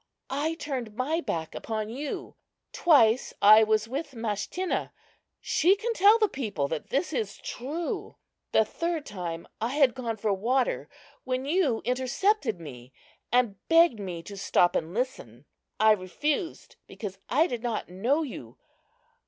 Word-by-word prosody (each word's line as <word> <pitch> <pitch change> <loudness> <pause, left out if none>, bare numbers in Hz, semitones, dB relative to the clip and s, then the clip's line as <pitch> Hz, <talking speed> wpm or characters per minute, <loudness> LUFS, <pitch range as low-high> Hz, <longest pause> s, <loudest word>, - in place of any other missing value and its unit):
I 300 +4 -1
turned 255 -9 -5
my 300 +8 0
back 160 -1 -3
upon 215 -1 -4
you. 275 +5 -5 0.4
Twice 255 -8 +4
I 215 +2 +8
was 215 0 +1
with 280 +4 -4
Mashtinna. 225 - -2 0.5
She 360 +5 +3
can 455 +3 -2
tell 420 +1 +6
the 435 -2 +3
people 205 - -3
that 160 - -4
this 300 +4 -1
is 220 -6 -2
true. 305 +7 -5 0.4
The 220 - +4
third 335 +1 -3
time 170 -4 -6
I 240 +5 -1
had 275 -5 +4
gone 235 -4 -4
for 210 -1 0
water 265 - 0 0.3
when 255 0 -2
you 290 -7 +1
intercepted 255 - +1
me 125 -6 -10 0.4
and 240 -5 +2
begged 330 -8 +5
me 180 -4 -5
to 200 +3 -9
stop 175 -2 +3
and 160 0 -1
listen. 180 - -4 0.3
I 215 +1 +6
refused 285 - -2
because 195 -3 -7
I 300 +6 +4
did 245 -8 -4
not 235 -3 -2
know 235 - 0
you. 125 - -8
245 Hz, 145 wpm, -27 LUFS, 205-300 Hz, 0.5 s, I